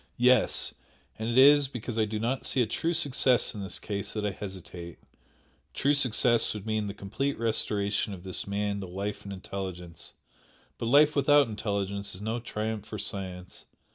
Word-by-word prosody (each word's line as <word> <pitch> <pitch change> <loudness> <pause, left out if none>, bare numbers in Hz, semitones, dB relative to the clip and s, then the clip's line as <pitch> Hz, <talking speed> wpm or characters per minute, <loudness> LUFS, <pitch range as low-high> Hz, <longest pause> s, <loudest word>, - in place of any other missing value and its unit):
Yes! 125 -1 +4 0.5
And 110 +1 -2
it 120 - 0
is 145 +1 +7
because 120 -3 -5
I 110 - +3
do 110 0 -3
not 120 +5 -1
see 130 - +2
a - - 0
true 165 +10 -1
success 130 -5 +2
in 105 - -6
this 95 - -5
case 100 -2 -5
that 105 -1 -2
I 105 - 0
hesitate; 90 -3 -8 0.8
true 140 +2 +2
success 120 -4 +3
would 105 -1 -7
mean 110 -1 -1
the 100 - -6
complete 135 +8 -3
restoration 105 -3 0
of 90 -3 -8
this 95 0 -3
man 100 0 -1
to 95 - -6
life 100 +4 -5
and 100 - -6
intelligence, 95 -3 -7 0.7
but 115 - -2
life 145 +4 +5
without 145 -1 +5
intelligence 100 -2 -2
is 95 - -9
no 110 +2 -2
triumph 110 -2 -4
for 110 0 -7
science. 90 -3 -6
105 Hz, 175 wpm, -28 LUFS, 100-125 Hz, 0.8 s, is